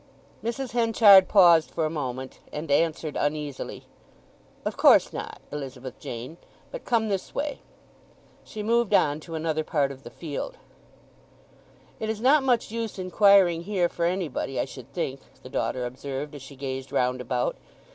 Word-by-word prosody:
Mrs. 240 +3 -3
Henchard 225 -5 +6
paused 170 -5 +6
for 160 - -1
a - - 0
moment, 130 -4 -5
and 150 0 -5
answered 155 0 +1
uneasily, 145 -2 -3 0.8
"Of - - -2
course - - +5
not, - - -6
Elizabeth 135 -3 -7
Jane. 125 +8 -7 0.3
But - - -8
come 230 -3 +1
this 195 -3 -3
way." 290 0 -2 0.8
She 215 - -7
moved 235 0 +2
on 145 0 +3
to 165 +1 -8
another 155 -1 -1
part 145 -3 0
of 135 -1 -11
the - - -10
field. 170 - -6 1.4
"It 220 - -3
is 220 -1 -2
not 275 +6 +5
much 245 -5 +1
use 230 -2 -4
inquiring 185 -2 +4
here 190 -3 +1
for 170 0 -2
anybody, 170 -7 -2
I - - +1
should 130 -2 -11
think," 135 -6 -3 0.2
the 125 - -10
daughter 125 -1 -2
observed, 135 +3 -5
as 145 - -9
she 135 +2 -11
gazed 135 -1 -5
round 125 0 0
about. 125 0 -1
160 Hz, 155 wpm, -26 LUFS, 135-210 Hz, 1.4 s, Henchard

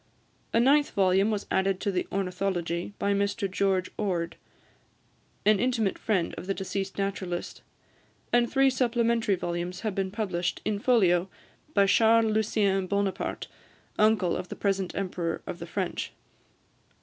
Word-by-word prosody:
A 230 - +3
ninth 285 +4 +4
volume 195 +1 +3
was 210 -2 -2
added 190 0 +1
to 200 - 0
the 180 -1 -1
"Ornithology" 180 -2 -2
by 200 - +1
Mr 200 0 0
George 190 -1 0
Ord, 170 -5 -1 1.1
an 210 -1 +5
intimate 230 -4 0
friend 190 -6 0
of 175 - -9
the 195 - 0
deceased 195 0 -4
naturalist; 190 -3 -3 0.7
and 240 -1 +3
three 270 0 +4
supplementary 235 -4 +1
volumes 175 +1 -4
have 215 -3 -2
been 195 0 -1
published, 185 -4 -2
in 210 -1 0
folio, 190 -7 +3 0.5
by 200 -1 +5
Charles 225 +2 +4
Lucien 200 -3 +1
Bonaparte, 200 0 -1 0.5
uncle 210 -5 +3
of 180 - -4
the - - -5
present 195 -2 -1
Emperor 180 -3 -3
of - - -6
the - - -7
French. - - -3
195 Hz, 140 wpm, -27 LUFS, 185-215 Hz, 1.1 s, an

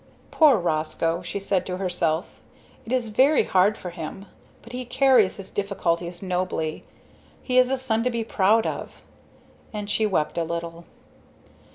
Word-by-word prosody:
"Poor 300 -7 +6
Roscoe!" 165 0 -1
she 180 +3 -4
said 195 -1 0
to 180 -1 -3
herself. 175 -3 -2 0.5
"It - - -6
is 250 -3 0
very 265 +7 +4
hard 195 +3 +3
for 180 - -7
him. 170 +3 -7 0.4
But 235 - -13
he 250 +1 -4
carries 250 -5 +3
his 195 -1 -9
difficulties 175 -3 -2
nobly. 180 -4 -2 0.6
He 255 -1 +3
is 255 0 +4
a 270 - +1
son 230 -3 0
to - - +3
be 235 -2 -2
proud 220 +1 +2
of." - - -5 0.7
And 210 -1 -5
she 220 0 +2
wept 170 -4 0
a - - +1
little. 170 0 -5
195 Hz, 160 wpm, -24 LUFS, 170-230 Hz, 0.7 s, Poor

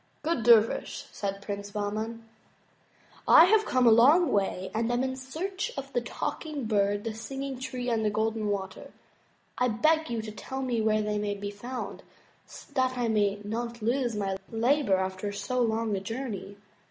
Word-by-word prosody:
"Good 315 -5 0
dervish," 230 -1 +3
said 200 -1 -4
Prince 200 0 -5
Bahman, 215 +2 -4 1.0
"I 325 - +9
have 430 +3 +3
come 255 -1 +2
a 230 - +8
long 280 +8 +6
way 195 -2 0
and 225 +2 0
am 245 +1 +1
in 260 0 -2
search 360 - -4
of - - -6
the - - +1
Talking 300 -5 -4
Bird, 205 -1 +1
the 225 - -3
Singing 270 +4 -5
Tree, 255 -1 -4
and 230 -2 +1
the 215 - +2
Golden 220 +1 -1
Water. 195 -2 -4 0.7
I 250 - +3
beg 310 +7 +2
you 230 -2 -2
to 215 - -6
tell 265 +5 -5
me 240 -3 0
where 215 0 +2
they 210 0 -1
may 205 -1 -2
be 200 0 -5
found, 245 +5 -6 0.7
that 255 -1 +1
I 240 -2 0
may 205 -2 +1
not 235 +2 -4
lose 240 0 0
my 195 -2 -1
labor 235 -1 +2
after 190 +2 -3
so 225 +5 -2
long 225 -2 +1
a - - -1
journey." 205 -2 -5
225 Hz, 175 wpm, -28 LUFS, 205-255 Hz, 1.0 s, I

